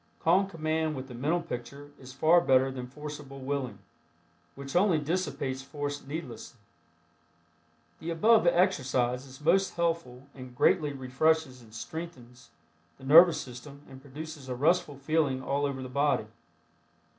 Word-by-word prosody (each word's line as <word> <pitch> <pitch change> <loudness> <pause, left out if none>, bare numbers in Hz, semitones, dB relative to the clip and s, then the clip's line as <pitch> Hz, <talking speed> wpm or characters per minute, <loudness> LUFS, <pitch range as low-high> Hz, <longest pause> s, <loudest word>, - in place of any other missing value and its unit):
Calm 185 +4 +3
command 160 -3 -1
with 130 0 -6
the - - -8
mental 155 +8 -1
picture 140 0 -7
is 130 -1 -11
far 160 +6 +4
better 135 -3 +3
than 125 -1 -6
forcible 145 0 -9
willing, 130 -5 -3 0.8
which 135 +1 -8
only 180 -2 +4
dissipates 145 -4 -2
force 145 +1 -5
needlessly. 145 -4 -7 1.4
The 165 - -6
above 215 +4 +4
exercise 135 -8 +1
is 135 +1 -13
most 195 +6 +2
helpful 165 -7 -2
and 130 -2 -11
greatly 145 +3 +3
refreshes 135 +1 0
and 110 -2 -17
strengthens 125 -2 -9 0.5
the 130 - -17
nervous 165 +5 +7
system 140 +3 -10
and 135 0 -13
produces 145 0 -9
a 125 - -2
restful 155 +2 +1
feeling 140 -2 0
all 140 +2 0
over 135 -2 -5
the - - -6
body. 140 +2 +1
140 Hz, 140 wpm, -29 LUFS, 130-160 Hz, 1.4 s, nervous